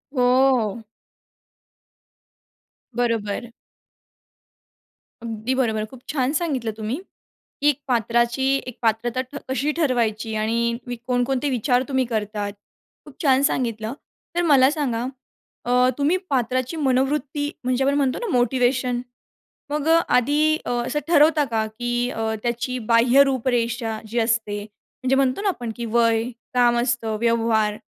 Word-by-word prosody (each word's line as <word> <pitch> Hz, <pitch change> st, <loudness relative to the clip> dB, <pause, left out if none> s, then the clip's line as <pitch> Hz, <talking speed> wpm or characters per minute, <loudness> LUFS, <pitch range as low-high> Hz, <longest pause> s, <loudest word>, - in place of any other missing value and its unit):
हो. 250 Hz, -3 st, +3 dB, 2.1 s
बरोबर. 230 Hz, -1 st, -1 dB, 1.7 s
अगदी 225 Hz, +2 st, -3 dB
बरोबर. 220 Hz, -5 st, 0 dB
खूप 245 Hz, +3 st, -14 dB
छान 270 Hz, -2 st, 0 dB
सांगितलं 280 Hz, -9 st, -1 dB
तुम्ही. 220 Hz, +6 st, -3 dB, 0.6 s
की 295 Hz, -, +5 dB
एक 290 Hz, -2 st, 0 dB
पात्राची 235 Hz, +1 st, +1 dB, 0.2 s
एक 250 Hz, -, -7 dB
पात्रता 230 Hz, +2 st, 0 dB
ठ 260 Hz, +2 st, -12 dB
कशी 275 Hz, +3 st, 0 dB
ठरवायची 230 Hz, -7 st, 0 dB
आणि 235 Hz, +2 st, 0 dB
वि 245 Hz, -, -3 dB
कोणकोणते 250 Hz, +2 st, 0 dB
विचार 250 Hz, 0 st, +1 dB
तुम्ही 265 Hz, -2 st, +1 dB
करतात? 210 Hz, -3 st, -3 dB, 0.5 s
खूप 295 Hz, -3 st, -14 dB
छान 265 Hz, -2 st, +4 dB
सांगितलं. 230 Hz, -4 st, -1 dB, 0.4 s
तर, 350 Hz, -, +2 dB
मला 265 Hz, -2 st, +6 dB
सांगा 255 Hz, -7 st, -1 dB, 0.6 s
अ, 250 Hz, +1 st, +4 dB
तुम्ही 295 Hz, +6 st, +2 dB
पात्राची 255 Hz, +2 st, -1 dB
मनोवृत्ती 285 Hz, +1 st, 0 dB
म्हणजे 255 Hz, +1 st, +1 dB
आपण 275 Hz, +1 st, +2 dB
म्हणतो 270 Hz, -3 st, +1 dB
ना 480 Hz, -, -4 dB
मोटिवेशन. 250 Hz, 0 st, +1 dB, 0.7 s
मग 300 Hz, +1 st, -1 dB
अ, 330 Hz, +1 st, +6 dB, 0.2 s
आधी 300 Hz, +5 st, +3 dB
अ, -, -, -4 dB, 0.2 s
असं 295 Hz, -, -1 dB
ठरवता 305 Hz, -2 st, +5 dB
का? 220 Hz, -1 st, 0 dB
की 240 Hz, +2 st, -2 dB
अ, 220 Hz, -2 st, -2 dB
त्याची 240 Hz, +1 st, -2 dB
बाह्य 240 Hz, +4 st, +6 dB
रूपरेषा 240 Hz, -3 st, -1 dB
जी 235 Hz, +3 st, -2 dB
असते 225 Hz, -2 st, 0 dB
म्हणजे, 255 Hz, +5 st, -4 dB
म्हणतो 270 Hz, +6 st, +1 dB
ना 415 Hz, -, +1 dB
आपण 240 Hz, -11 st, -3 dB
की 235 Hz, -, -4 dB
वय 230 Hz, -1 st, +3 dB, 0.3 s
काम 240 Hz, -1 st, +4 dB
असतं 240 Hz, -3 st, 0 dB
व्यवहार 225 Hz, -2 st, +2 dB
245 Hz, 130 wpm, -23 LUFS, 230-270 Hz, 2.1 s, मला